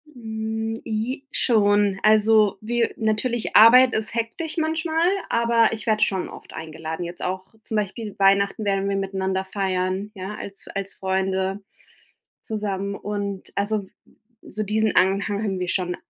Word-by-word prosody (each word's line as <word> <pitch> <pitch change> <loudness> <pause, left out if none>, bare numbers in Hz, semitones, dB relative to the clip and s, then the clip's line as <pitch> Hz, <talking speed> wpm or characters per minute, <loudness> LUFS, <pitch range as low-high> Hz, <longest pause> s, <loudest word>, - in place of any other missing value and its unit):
Hm, 220 -1 -4
ji 245 +6 -3
schon. 205 -4 +3
Also, 215 -1 +4
wir 235 +1 0
natürlich, 220 +2 -1
Arbeit 245 +3 +8
ist 215 +1 -2
hektisch 235 +9 -3
manchmal, 320 +1 +1 0.2
aber 235 -1 +3
ich 220 -1 -5
werde 220 -1 +2
schon 190 -4 0
oft - - -12
eingeladen. 160 +1 -6
Jetzt 175 +1 -8
auch, 185 +1 -3 0.2
zum 220 - -5
Beispiel 210 +1 -3
Weihnachten 200 +2 +3
werden 195 0 0
wir 200 - 0
miteinander 190 -1 -2
feiern, 190 +1 -2
ja, 190 +2 -6
als 200 -1 -9
als 195 0 -5
Freunde 190 0 -1 0.8
zusammen 200 -2 -3
und 200 -1 -4
also 205 0 -1 0.6
so 215 - -4
diesen 215 +1 +1
Anhang 200 +2 +2
haben 195 -3 -2
wir 180 -1 -2
schon. 180 -1 -1
205 Hz, 140 wpm, -23 LUFS, 195-220 Hz, 0.8 s, Arbeit